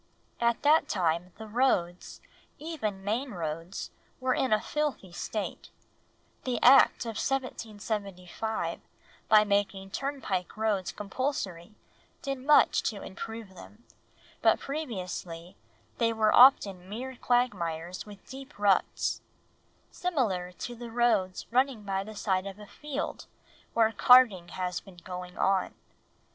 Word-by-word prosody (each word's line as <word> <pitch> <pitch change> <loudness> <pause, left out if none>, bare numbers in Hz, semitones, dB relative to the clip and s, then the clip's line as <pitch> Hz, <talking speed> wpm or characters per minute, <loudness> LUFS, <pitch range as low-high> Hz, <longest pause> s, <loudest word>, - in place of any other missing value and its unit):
At 235 -1 +1
that 305 +2 +4
time 175 -1 0
the 220 - -8
roads, 210 -7 0 0.4
even 245 -12 -4
main 235 +6 -2
roads, 165 +1 -5 0.3
were 255 0 +1
in 260 - 0
a 215 - +4
filthy 285 -6 -3
state; 205 +4 -5 0.7
the 250 -2 -1
Act 255 -1 +7
of 225 -2 -4
1775, 215 -5 -3 0.5
by 215 -1 +7
making 200 -1 -1
turnpike 240 -9 -3
roads 210 -4 0
compulsory, 210 -4 -4 0.5
did 275 -1 -3
much 290 +3 +5
to 205 -3 -8
improve 220 +1 -7
them, 210 +5 -14 0.6
but - - +4
previously 185 - -5 0.4
they 230 -1 +3
were 215 -1 +3
often 200 -8 +6
mere 255 +5 -5
quagmires 180 -10 -1
with 205 -2 -13
deep 270 -2 -10
ruts, 205 -2 +1 0.7
similar 220 - -1
to 240 - -6
the 240 0 -8
roads 225 -6 +1
running 255 -2 +2
by 195 -1 -2
the 215 +1 -10
side 190 -2 0
of 195 0 -7
a 210 - -11
field 295 +6 -5 0.5
where 225 -1 +4
carting 225 -8 +6
has 180 0 -3
been 190 -3 -16
going 180 +1 -8
on. 195 -1 +1
210 Hz, 125 wpm, -29 LUFS, 185-250 Hz, 0.7 s, Act